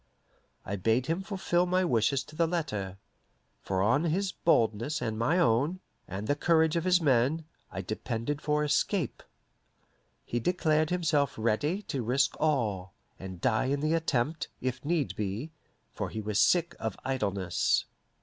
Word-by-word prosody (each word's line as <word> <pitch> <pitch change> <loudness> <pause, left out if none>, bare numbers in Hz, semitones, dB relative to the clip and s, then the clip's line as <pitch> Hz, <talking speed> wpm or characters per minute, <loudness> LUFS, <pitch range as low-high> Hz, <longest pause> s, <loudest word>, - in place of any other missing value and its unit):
I 100 - -3
bade 115 +6 +1
him 165 +6 -1
fulfill 190 -3 0
my 185 +1 +2
wishes 130 -1 +2
to 155 - -14
the 165 +1 +2
letter, 105 - -3 0.6
for 95 -1 -1
on 120 +10 +3
his 185 +4 0
boldness 120 -1 +1
and 110 -4 -2
my 120 +10 +1
own, 145 +5 +2 0.3
and 100 +3 -5
the 145 - +1
courage 160 +1 +3
of 170 +1 0
his 180 -1 +5
men, 145 +1 +2 0.3
I 95 - -5
depended 115 +8 -3
for 150 0 +1
escape. 150 - 0 1.0
He 120 - -2
declared 155 +1 +1
himself 155 -6 +1
ready 145 - 0
to 135 - -3
risk 125 +4 +1
all, 110 - 0 0.2
and 95 -2 -8
die 110 - +2
in 140 +2 0
the 155 +2 +1
attempt, 155 -2 0
if 130 0 -3
need 155 -2 0
be, 105 +9 -3 0.4
for - - -3
he 110 - -5
was 105 -1 -1
sick 170 -1 +3
of 110 -3 -3
idleness. 100 -9 0
140 Hz, 155 wpm, -29 LUFS, 110-165 Hz, 1.0 s, his